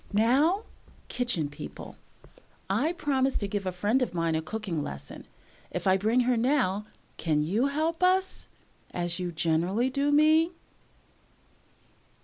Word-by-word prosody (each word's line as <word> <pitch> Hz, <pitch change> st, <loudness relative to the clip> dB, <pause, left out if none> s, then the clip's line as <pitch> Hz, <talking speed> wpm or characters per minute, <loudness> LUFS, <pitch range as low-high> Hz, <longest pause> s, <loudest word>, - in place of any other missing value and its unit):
"Now, 275 Hz, -, +3 dB, 0.5 s
Kitchen 240 Hz, -12 st, 0 dB
People, 145 Hz, -, -9 dB, 0.8 s
I 255 Hz, +12 st, +2 dB
promised 270 Hz, -5 st, 0 dB
to 200 Hz, -, -1 dB
give 200 Hz, -1 st, -3 dB
a -, -, 0 dB
friend 205 Hz, +8 st, +1 dB
of 245 Hz, -, -1 dB
mine 165 Hz, -1 st, 0 dB
a 160 Hz, -, 0 dB
cooking 180 Hz, -2 st, -4 dB
lesson. 70 Hz, -, -8 dB, 0.4 s
If -, -, -5 dB
I 190 Hz, -1 st, +5 dB
bring 220 Hz, +6 st, +2 dB
her 250 Hz, 0 st, +2 dB
now, 225 Hz, -5 st, +1 dB, 0.3 s
can 150 Hz, -3 st, +1 dB
you 210 Hz, -, +1 dB
help 315 Hz, +4 st, -1 dB
us, 375 Hz, +1 st, +1 dB, 0.4 s
as 175 Hz, -1 st, -2 dB
you 180 Hz, -1 st, -3 dB
generally 170 Hz, +10 st, +1 dB
do 280 Hz, +2 st, +1 dB
me?" 315 Hz, +3 st, +4 dB
220 Hz, 135 wpm, -28 LUFS, 175-280 Hz, 0.8 s, I